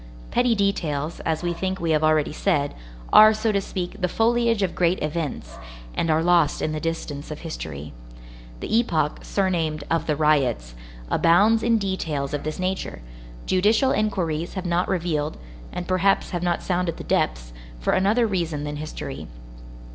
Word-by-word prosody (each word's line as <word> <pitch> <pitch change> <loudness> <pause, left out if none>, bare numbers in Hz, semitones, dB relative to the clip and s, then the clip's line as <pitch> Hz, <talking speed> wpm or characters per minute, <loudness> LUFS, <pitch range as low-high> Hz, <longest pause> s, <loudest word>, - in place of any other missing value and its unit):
Petty 245 -1 +3
details, 165 -7 -1
as 160 +1 -1
we 175 0 0
think 190 +2 -3
we 165 -1 0
have 155 0 +2
already 155 -1 +2
said, 150 -6 0 0.4
are, 215 0 +9
so 215 +1 0
to 200 -1 +1
speak, 190 +1 -5
the 180 - +2
foliage 230 +1 +2
of 185 - -1
great 175 +1 +1
events, 150 - -4 0.3
and 165 - -1
are 160 +1 +3
lost 170 -4 +3
in 155 - -1
the 155 - -2
distance 155 -3 -4
of 150 - -7
history. 75 - -6 0.7
The - - -1
epoch, 160 -10 0
surnamed 165 -6 -1
"of 165 - 0
the 150 - +1
riots," 140 - +1 0.4
abounds 205 +7 +4
in 230 0 +3
details 165 -9 -2
of 145 - -1
this 155 0 -4
nature. 185 - -3 0.4
Judicial 215 +8 +3
inquiries 175 -6 -1
have 190 -1 -4
not 175 +1 +1
revealed, 160 -5 -1 0.3
and 175 -1 -5
perhaps 190 +1 +2
have 175 -2 -2
not 175 -1 0
sounded 180 -2 -1
the - - -7
depths, - - -1 0.3
for - - 0
another 210 +5 +3
reason 170 -8 -2
than 150 0 -4
history. 155 +1 -6
170 Hz, 165 wpm, -24 LUFS, 155-195 Hz, 0.7 s, are